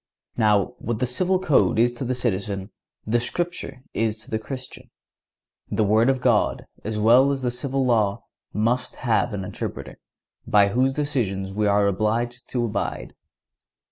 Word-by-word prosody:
Now 105 -4 +2
what 120 -1 -2
the 125 - 0
civil 180 +10 +1
code 155 -11 +2
is 120 +2 +3
to 120 - -5
the 130 +1 -1
citizen, 100 -4 -2 0.3
the 120 +3 +2
Scripture 170 0 -3
is 110 -1 0
to - - -14
the 110 - 0
Christian. 130 +3 -8 0.8
The 110 - +1
Word 110 +4 +3
of 130 -1 +1
God, 120 -4 +2 0.2
as 110 0 -3
well 120 +6 +5
as 135 -2 -3
the 125 - +1
civil 135 +2 -1
law, 110 -5 +1 0.3
must 120 +5 0
have 120 -1 +1
an 100 -2 -4
interpreter, - - -6 0.5
by 100 -1 +5
whose 130 +5 +2
decision 110 -10 -1
we 105 +1 +1
are 100 0 +3
obliged 115 +5 -1
to 120 -2 0
abide. 105 -3 -3
120 Hz, 160 wpm, -24 LUFS, 105-130 Hz, 0.8 s, well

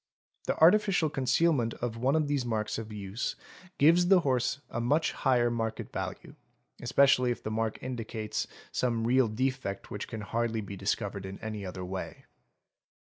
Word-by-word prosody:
The - - 0
artificial 180 -2 +4
concealment 130 -2 +2
of 120 -2 -3
one 130 +5 +1
of 155 -2 +2
these 145 -3 0
marks 110 -2 -2
of 110 -1 -7
use 100 +2 -4 0.4
gives 170 +5 +5
the 185 -1 +6
horse 125 -2 0
a 120 - -2
much 145 +7 +2
higher 120 -2 +2
market 115 -1 -3
value, - - -5 0.5
especially 125 +1 +4
if 120 - -3
the 110 - -3
mark 110 0 -1
indicates 115 -4 -3 0.2
some 115 -3 0
real 125 +1 +4
defect 120 -3 -2
which 105 - -4
can 110 -2 -6
hardly 115 +1 -1
be 100 -1 -7
discovered 100 0 -2
in 95 0 -7
any 110 -2 -5
other 90 -1 -6
way. 95 +1 -6
120 Hz, 160 wpm, -30 LUFS, 110-135 Hz, 0.5 s, the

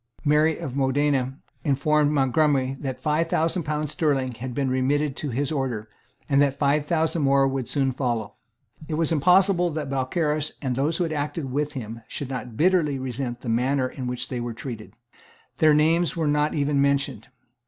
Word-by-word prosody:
Mary 150 +2 +3
of 130 - -6
Modena 135 -1 +1 0.3
informed 150 +1 +2
Montgomery 135 -1 +2
that 130 -3 -4
five 155 +2 0
thousand 165 +3 +1
pounds 150 -1 -2
sterling 135 -6 0
had 120 +2 -6
been 140 -2 0
remitted 135 +2 +1
to 150 - -3
his 135 +4 -1
order, 125 -7 -2 0.4
and 140 -1 +3
that 140 -1 +2
five 145 +1 +1
thousand 160 0 +1
more 135 -1 +4
would 135 -2 -3
soon 135 -2 +1
follow. 120 -5 -2 0.5
It 155 - -2
was 165 0 +1
impossible 180 +3 +4
that 150 -3 -4
Balcarras 150 +3 0
and 130 -3 -2
those 150 +5 0
who 180 - +1
had 160 -2 -2
acted 145 -1 -3
with 145 +2 -1
him 115 -4 -6
should 135 -2 -6
not 125 -3 -6
bitterly 165 -5 +3
resent 125 -1 -4
the 120 - -5
manner 130 +3 +1
in 130 0 -6
which 125 0 -3
they 125 - -3
were 120 -1 -4
treated. 115 -4 -8 0.6
Their 155 -1 +5
names 165 +3 +2
were 165 - 0
not 150 +1 +1
even 145 -1 +1
mentioned. 140 0 0
140 Hz, 180 wpm, -24 LUFS, 130-150 Hz, 0.6 s, Their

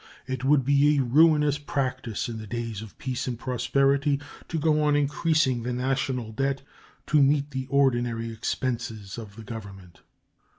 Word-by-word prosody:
It 130 -1 -4
would 135 -1 +3
be 145 +2 +4
a 135 - +3
ruinous 150 +2 +4
practice 130 -6 -2
in 115 -2 -5
the 110 - -8
days 115 -2 -4
of 110 -2 -11
peace 130 -1 -3
and 120 -2 -2
prosperity 135 +3 +1 0.3
to 165 - -3
go 155 -1 +2
on 150 -1 +3
increasing 145 -3 +2
the 125 +2 -3
national 130 -2 -1
debt 135 +4 -1 0.4
to 150 -1 +3
meet 140 +1 +2
the 130 -1 -4
ordinary 120 -4 +1
expenses 115 -2 -3
of 105 -3 -10
the 115 - -10
Government. 95 -6 -10
130 Hz, 160 wpm, -26 LUFS, 115-140 Hz, 0.4 s, be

